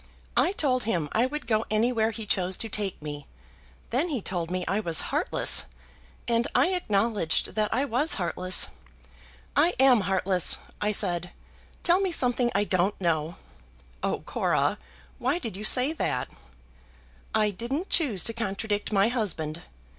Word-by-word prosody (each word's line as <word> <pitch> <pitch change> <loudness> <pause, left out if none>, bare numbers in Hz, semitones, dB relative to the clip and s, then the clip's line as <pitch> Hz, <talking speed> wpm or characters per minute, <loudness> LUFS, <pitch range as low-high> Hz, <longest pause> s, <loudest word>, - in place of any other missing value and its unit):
I - - +3
told 255 - 0
him 170 -9 -1
I 235 +3 +2
would 300 +2 -6
go 220 -1 +1
anywhere 220 +1 +1
he 225 -1 -5
chose 185 -2 -1
to 225 - -4
take 200 -2 -3
me. 145 -1 -7 0.6
Then 280 +9 0
he 280 -6 -1
told 175 -4 -4
me 180 0 -3
I 195 - 0
was 170 -6 +1
heartless; - - +3 0.6
and 235 0 +1
I - - +4
acknowledged 215 - 0
that 215 0 -1
I 260 +5 +1
was 280 +5 +1
heartless. 185 0 +3 0.9
'I 315 +6 +3
am 260 -4 +5
heartless,' 190 -1 +1 0.2
I 210 - +1
said. 180 -4 -1 0.5
'Tell 355 +1 +3
me 385 -2 0
something 245 -5 +2
I 200 - +3
don't 190 0 0
know.'" 165 -2 -1 0.7
"Oh, - - -2
Cora, - - 0 0.4
why 260 +7 0
did 230 - -6
you 205 - -7
say 255 +7 +6
that?" - - -2 1.1
"I 215 -1 +2
didn't 260 - -4
choose 245 - +2
to 230 - 0
contradict 210 -2 -3
my 200 0 +3
husband. 170 -9 -1
215 Hz, 155 wpm, -26 LUFS, 185-250 Hz, 1.1 s, say